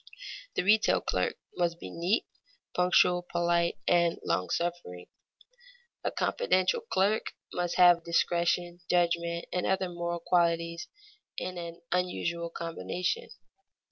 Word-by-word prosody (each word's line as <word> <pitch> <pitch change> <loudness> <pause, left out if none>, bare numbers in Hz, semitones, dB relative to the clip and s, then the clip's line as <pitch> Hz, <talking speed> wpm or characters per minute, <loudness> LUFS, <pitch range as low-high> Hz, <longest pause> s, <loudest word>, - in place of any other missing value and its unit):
The - - +1
retail 215 +3 +4
clerk - - -1 0.2
must 170 -1 0
be 90 - -8
neat, 180 - 0 0.5
punctual, 180 0 +4
polite, 170 0 +1
and 170 -1 +3
long 90 - 0
suffering. 170 - -3 1.0
A - - +1
confidential 185 - +1
clerk 215 - 0 0.2
must 175 -1 -1
have 175 -2 +6
discretion, 170 +1 +1
judgment, 170 -1 +1
and 180 - 0
other 190 -1 0
moral 170 0 -3
qualities 170 -1 +1 0.5
in 180 -1 -4
an 170 0 -7
unusual 170 -2 -1
combination. 170 - -3
175 Hz, 110 wpm, -29 LUFS, 170-180 Hz, 1.0 s, have